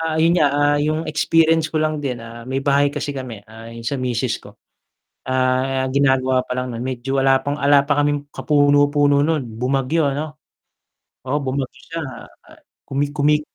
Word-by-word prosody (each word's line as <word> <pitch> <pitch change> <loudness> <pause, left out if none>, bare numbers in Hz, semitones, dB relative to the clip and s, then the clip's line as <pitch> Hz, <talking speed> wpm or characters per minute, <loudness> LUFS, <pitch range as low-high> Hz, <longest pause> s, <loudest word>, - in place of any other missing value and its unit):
Ah, 160 -1 -1
yun 165 - +4
nga, 150 - +4
ah, 145 0 +3
yung 155 +2 0
experience 160 +1 +3
ko 160 - -14
lang 155 0 -1
din, 130 -5 -4
ah, 115 +1 -10
may 135 +1 -2
bahay 140 0 +3
kasi 145 0 -3
kami, 130 -7 -7
ah, 110 +1 -11
yung 115 0 -9
sa 125 +4 -2
misis 125 -1 -1
ko. - - -15 0.7
Ah, 130 +1 +1
ginagawa 130 -2 +2
pa 125 - -3
lang 125 0 -3
nun, 120 +2 -5
medyo 130 +1 -3
wala 135 0 +3
pang 145 +1 -3
wala 140 0 +4
pa 145 +1 0
kaming 145 0 0
kapuno-puno 145 -1 +3
nun 155 -3 0 0.2
bumagyo 135 +5 0
ano? 150 +1 -5 0.9
Oo, 140 +3 -1
bumagyo 135 -1 -3 0.2
siya, 165 0 -4 0.4
ah, - - -18 0.2
kumi 140 +1 -1
kumi 150 +1 +3
140 Hz, 175 wpm, -20 LUFS, 130-145 Hz, 0.9 s, yun